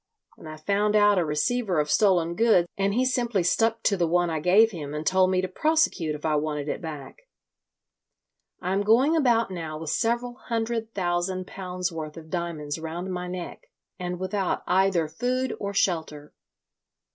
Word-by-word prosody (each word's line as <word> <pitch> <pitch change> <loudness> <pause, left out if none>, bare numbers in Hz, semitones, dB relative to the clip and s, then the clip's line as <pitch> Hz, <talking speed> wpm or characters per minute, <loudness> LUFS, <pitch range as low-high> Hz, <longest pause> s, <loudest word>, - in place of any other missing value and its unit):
And - - -11
I 155 - -8
found 205 +6 0
out 205 -2 +5
a - - +2
receiver 180 +5 0
of 150 0 0
stolen 175 -5 +3
goods, 185 -3 +3
and 200 +1 0
he 255 +2 +2
simply 240 -6 0
stuck 225 +5 +1
to 200 - +3
the 175 -3 +1
one 175 0 +1
I 160 - -1
gave 200 +8 +5
him 150 -5 -6
and 150 +1 -4
told 185 +1 +3
me 185 -1 +2
to 185 - -2
prosecute 195 - +1
if 150 - -8
I 155 -1 +2
wanted 150 -1 -2
it - - -3
back. 160 - -9 1.3
I 180 +2 -1
am 195 - +1
going 245 +10 +4
about 235 -8 +2
now 160 -4 -5
with 155 -1 -4
several 240 +3 0
hundred 225 -1 -2
thousand 185 0 -1
pounds 180 -1 -4
worth 155 -1 -6
of 160 -1 -11
diamonds 165 -4 -3
round 170 +4 -5
my 180 0 -4
neck, 180 -1 -7 0.3
and 180 -1 -4
without 190 0 -2
either 185 -3 +2
food 250 +9 -2
or 200 - -3
shelter. 160 -6 -1
185 Hz, 180 wpm, -26 LUFS, 160-220 Hz, 1.3 s, out